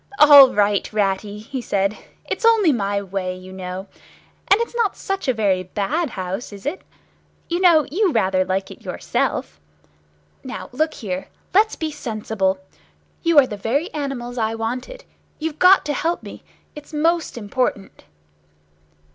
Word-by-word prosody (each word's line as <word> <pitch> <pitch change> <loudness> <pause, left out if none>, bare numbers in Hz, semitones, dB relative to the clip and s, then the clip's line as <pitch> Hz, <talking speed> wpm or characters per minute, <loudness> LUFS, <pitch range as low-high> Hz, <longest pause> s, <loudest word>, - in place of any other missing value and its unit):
"All 285 -3 +9
right, 205 -1 +1
Ratty," 205 0 -1
he 240 +5 -6
said. 200 -2 0 0.3
"It's - - -4
only 450 -7 +5
my 200 -4 -1
way, 185 -1 -3
you 185 0 -11
know. 185 0 -6 0.6
And 395 - +5
it's 470 - -2
not 455 -5 0
such 390 -5 -3
a - - +4
very 200 -6 +1
bad 210 - -2
house, 190 +2 -5
is 200 +2 -11
it? 320 +7 -3 0.7
You 345 +1 0
know 340 -5 +5
you 380 +2 +2
rather 190 -6 +2
like 190 +1 -2
it - - -12
yourself. 75 -1 -2 0.8
Now, - - -7
look 310 +5 -1
here. 190 -3 -5 0.3
Let's 430 +3 +4
be 315 -1 -3
sensible. 215 -7 -2 0.6
You 335 -2 +2
are 285 - +9
the 210 -5 -6
very 275 - -1
animals 255 -4 -4
I 220 0 0
wanted. 250 - -5 0.3
You've 310 -1 -4
got 370 +1 +6
to 295 - -1
help 330 +5 -1
me. - - -10 0.3
It's 295 +1 -12
most 325 -1 0
important!" 210 -2 -3
240 Hz, 155 wpm, -21 LUFS, 195-315 Hz, 0.8 s, All